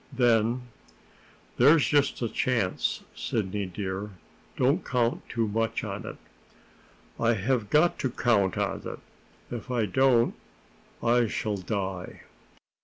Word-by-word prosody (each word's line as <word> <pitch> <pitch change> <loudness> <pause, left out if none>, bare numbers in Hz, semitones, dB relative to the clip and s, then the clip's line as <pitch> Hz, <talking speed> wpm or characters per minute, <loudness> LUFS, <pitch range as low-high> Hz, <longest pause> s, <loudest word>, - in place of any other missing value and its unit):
Then: 120 -1 +2 0.9
"There's 145 +4 +6
just 145 -4 +2
a - - +1
chance, 110 -3 0
Sidney 100 -2 -2
dear. 95 +2 -4 0.5
Don't 140 +7 +2
count 120 -2 0
too 115 -1 0
much 110 +2 -1
on - - -5
it." - - -7 1.0
"I 115 0 +3
have 110 +1 0
got 155 +6 +3
to 130 - 0
count 110 -6 +1
on - - -1
it. - - -6 0.6
If 120 +2 -8
I 120 -3 +1
don't, 120 +4 +3 0.7
I 120 0 +3
shall 105 -1 -2
die." 95 -2 -4
115 Hz, 120 wpm, -27 LUFS, 105-125 Hz, 1.0 s, There's